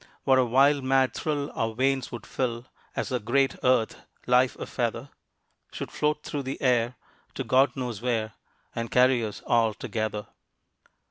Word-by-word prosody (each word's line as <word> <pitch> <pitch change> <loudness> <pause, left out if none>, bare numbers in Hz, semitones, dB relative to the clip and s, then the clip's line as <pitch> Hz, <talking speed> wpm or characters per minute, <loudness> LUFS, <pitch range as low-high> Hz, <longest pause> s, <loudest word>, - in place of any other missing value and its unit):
What 130 -1 +4
a 130 - +4
wild 135 +3 +4
mad 130 -2 +2
thrill 145 -2 -2
our 115 0 -2
veins 135 +1 0
would 120 - -7
fill 120 -2 -3 0.3
As - - -2
the 125 - 0
great 135 +5 +1
earth, 125 -3 +1 0.2
life 125 0 +3
a - - -6
feather, - - -3 0.6
Should - - -6
float 150 0 0
through 145 - -3
the 135 0 -5
air 125 -2 +2 0.4
to - - -2
God 135 +2 +3
knows 125 -5 -4
where, 115 -3 -1 0.4
And 115 -1 -3
carry 125 -1 +4
us 105 -2 -6
all 115 -2 +2
together. 110 -2 -3
125 Hz, 160 wpm, -27 LUFS, 115-135 Hz, 0.6 s, What